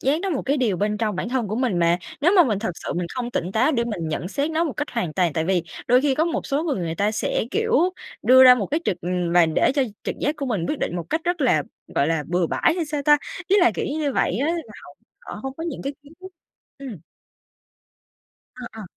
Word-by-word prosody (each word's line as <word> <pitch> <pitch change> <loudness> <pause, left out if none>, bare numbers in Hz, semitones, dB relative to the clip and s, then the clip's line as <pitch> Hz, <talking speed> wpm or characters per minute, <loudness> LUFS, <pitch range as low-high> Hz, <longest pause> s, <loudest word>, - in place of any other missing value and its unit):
giác 285 +5 +1
nó 390 +1 -2
một 290 - -1
cái 280 +2 0
điều 235 -9 +1
bên 210 +3 0
trong 215 -4 -1
bản 225 - -3
thân 245 -4 -1
của 215 - -2
mình 240 -8 0
mà. 170 +1 +3 0.2
Nếu 345 +6 +4
mà 355 - +8
mình 215 -7 0
thật 220 0 -2
sự - - -5
mình 175 0 -2
không 245 -1 -3
tỉnh 180 -5 -3
táo 255 +9 +2
để 235 -4 +1
mình 195 -9 -4
nhận 165 +3 -3
xét 280 +8 -1
nó 320 +1 +1
một 305 - -2
cách 295 - -4
hoàn 225 -10 -2
toàn, 175 -1 +1
tại 160 +2 -1
vì 180 0 +1 0.2
đôi 250 +1 +5
khi 280 -1 +1
có 310 - +2
một 335 -2 -2
số 280 +2 0
người 310 -5 -1
người 170 -3 -3
ta 205 +5 +1
sẽ, 220 - -1
kiểu, 450 +1 -1 0.5
đưa 260 +1 +7
ra 250 -1 +10
một 215 -6 -2
cái 305 - -1
trực, 180 - -1
ừm 175 -1 -2
và 175 -1 +5
để 160 +10 +2
cho 280 - +3 0.2
trực - - -2
giác 295 +2 0
của 280 - -4
mình 205 -9 -1
quyết 300 - -2
định 175 - -2
một 170 -2 -6
cách 320 - 0
rất 350 -1 -1
là, 240 - +3 0.3
gọi 140 - +2
là, 160 -3 0
bừa 175 0 +1
bãi - - +2
hay 345 - -1
sao 295 -1 -3
ta? 295 +1 +6 0.3
Ý 395 - +3
là, 240 - +5
kiểu, - - -2
cứ 295 - -3
như 290 -3 -1
vậy 195 - 0
á, 275 - 0
là 340 -1 -3 0.2
họ - - -13 0.5
họ - - -8
hông 270 0 -5
có 325 - -6
những 330 -5 -5
cái 275 +1 -4
kiến 290 +1 -17
thức. 375 - -9 0.5
Ừm. 260 -8 -8 1.6
Ờ, 250 -1 -8
ờ. 225 - -9
250 Hz, 275 wpm, -23 LUFS, 180-295 Hz, 1.6 s, ra